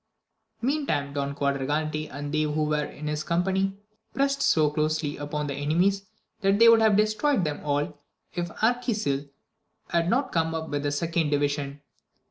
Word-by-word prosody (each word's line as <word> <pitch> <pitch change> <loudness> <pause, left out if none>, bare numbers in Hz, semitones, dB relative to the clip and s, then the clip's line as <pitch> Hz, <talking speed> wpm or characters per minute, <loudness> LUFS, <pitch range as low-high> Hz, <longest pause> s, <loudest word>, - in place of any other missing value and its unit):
Mean 285 +3 0
time 140 -2 -1
Don 140 0 -2
Quadragante 150 +3 -1
and 145 +2 -6
they 155 - +2
who 155 0 0
were 150 -1 0
in 150 - -9
his 150 0 -2
company 190 +3 0 0.4
prest 275 +1 +1
so 155 - +3
closely 155 0 0
upon 150 +1 -3
the 140 - -3
enemies, 180 +8 +1 0.3
that 195 -1 +3
they 230 +2 +7
would 230 -1 +7
have 215 -2 +5
destroyed 215 +3 +2
them 150 -2 -2
all, 145 0 -1 0.3
if 175 0 -2
Arquisil 215 - 0 0.6
had 170 0 +1
not 260 +5 +1
come 165 -1 0
up 160 0 -4
with 145 -1 -1
the 145 0 -1
second 165 +1 0
division. 145 -1 -1
155 Hz, 165 wpm, -26 LUFS, 145-195 Hz, 0.6 s, they